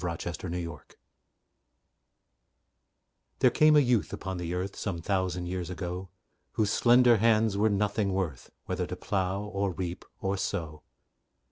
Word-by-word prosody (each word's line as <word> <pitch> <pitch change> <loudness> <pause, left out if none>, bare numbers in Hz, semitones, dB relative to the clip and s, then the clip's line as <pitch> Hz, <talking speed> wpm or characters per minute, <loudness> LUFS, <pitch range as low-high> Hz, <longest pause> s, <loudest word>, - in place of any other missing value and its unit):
THE - - 0
SHEPHERD 85 +2 -5
OF 85 - -4
KING 90 0 -2
ADMETUS 75 -4 -11 2.4
There 125 - +4
came 155 +4 +5
a - - +8
youth 120 -5 +1
upon 95 -1 -4
the 85 -1 -4
earth, 95 +2 -3
Some 95 -5 -3
thousand 90 0 -1
years 90 0 -4
ago, 90 +1 -5 0.4
Whose 105 -2 +1
slender 120 0 +5
hands 110 -1 +3
were 105 +2 +3
nothing 105 0 0
worth, 90 -9 -3 0.2
Whether - - -2
to - - -5
plough, 95 0 -1
or 100 -2 -2
reap, 90 0 -4 0.2
or 95 +1 -1
sow. 80 -5 -3
95 Hz, 150 wpm, -29 LUFS, 90-105 Hz, 2.4 s, a